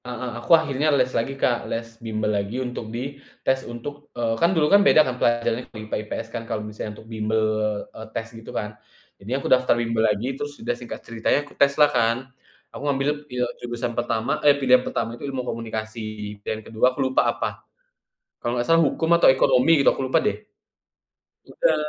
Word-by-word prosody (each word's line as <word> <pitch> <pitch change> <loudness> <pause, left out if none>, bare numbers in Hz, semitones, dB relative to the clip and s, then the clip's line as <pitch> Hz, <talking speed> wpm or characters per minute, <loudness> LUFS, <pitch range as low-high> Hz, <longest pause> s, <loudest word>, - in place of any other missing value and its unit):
Heeh, 125 0 -5
aku - - -6
akhirnya 145 -2 0
les 130 -1 +2
lagi 120 +4 -1
Kak 120 -3 +2
les 115 0 -3 0.2
bimbel 110 -1 -1
lagi 100 +4 -3
untuk 120 -3 -5
di 135 +5 -5 0.2
tes 130 0 +3
untuk 145 +5 -8
eee, 115 -1 0
kan 170 - +5
dulu 155 -2 +3
kan 200 - +8
beda 155 -6 +6
kan 125 - -2
pelajarannya 120 +1 +1
untuk - - -12
IPA 110 0 -5
IPS 110 +1 -5
kan 115 -1 -4
kalo 110 - -1
misalnya 105 0 -6
untuk - - -13
bimbel, 110 0 0 0.5
eee, 110 - -8
tes 115 +1 -4
gitu 115 0 -11
kan, 105 - -3 0.5
jadi 115 +7 -2
aku 135 - -6
daftar 130 -2 +3
bimbel 115 -1 0
lagi 110 +6 -1
terus 145 +1 -6
sudah 120 +1 -2
singkat 120 0 -8
ceritanya 115 +5 0
ku 145 - -16
tes 140 0 +3
lah 150 - +8
kan. 115 0 +3 0.6
Aku - - -8
ngambilnya 140 +1 +1
pil 125 -1 -1 0.2
jurusan 120 0 -3
pertama 120 +1 -1
eh, 145 -1 +6
pilihan 125 -1 +5
pertama 115 -2 -3
itu - - -10
ilmu 130 -2 -3
komunikasi 110 -1 -5 0.4
dan 110 - -2
kedua 110 +2 +1
aku - - -7
lupa 130 0 +3
apa, - - -3 0.8
kalau 120 +1 -2
nggak 120 - 0
salah 165 - +6
hukum 160 - -2
atau - - +7
ekonomi 130 +2 +4
gitu - - +6
aku - - -6
lupa 130 - +2
deh. 215 - +1 1.1
Udah, - - +1
120 Hz, 195 wpm, -24 LUFS, 115-135 Hz, 1.1 s, kan